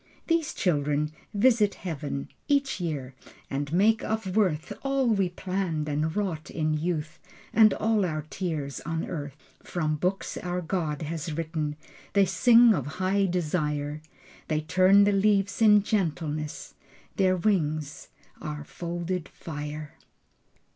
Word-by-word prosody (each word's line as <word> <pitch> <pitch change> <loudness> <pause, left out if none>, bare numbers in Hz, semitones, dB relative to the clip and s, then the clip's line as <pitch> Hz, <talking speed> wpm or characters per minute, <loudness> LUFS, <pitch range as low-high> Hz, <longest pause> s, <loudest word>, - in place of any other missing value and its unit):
These 330 -2 0
children 150 -3 +1 0.2
visit 210 -1 +3
Heaven 145 -5 -5 0.2
Each 280 -6 +1
year 140 -6 -3 0.4
and 140 +1 -2
make 215 +6 +3
of 220 -4 -2
worth 180 -8 +1
All 275 -1 +1
we 200 -6 +2
planned 180 -4 -2
and 150 +2 -1
wrought 185 -7 -2
in 155 -1 -1
youth 155 0 -2 0.3
And 220 -2 +7
all 220 -1 +1
our 155 -4 -2
tears 155 -7 -3
on 165 -1 -3
earth. 145 -4 -5 0.2
From 155 -3 -2
books 180 +5 -2
our 180 0 -2
God 165 -3 -2
has 160 +1 -4
written 155 -2 -2 0.4
They 200 -1 +5
sing 230 +6 +6
of 145 -8 -2
high 195 +1 +2
desire. 150 -4 -1 0.5
They 155 -1 0
turn 185 +5 +5
the 205 - +4
leaves 200 +1 +2
in 210 -2 +7
gentleness. 155 -7 -2 0.4
Their 185 -1 +3
wings 155 -6 -1 0.3
are 150 -1 -5
folded 175 +2 -4
fire. 150 -1 -7
170 Hz, 130 wpm, -27 LUFS, 150-200 Hz, 0.5 s, And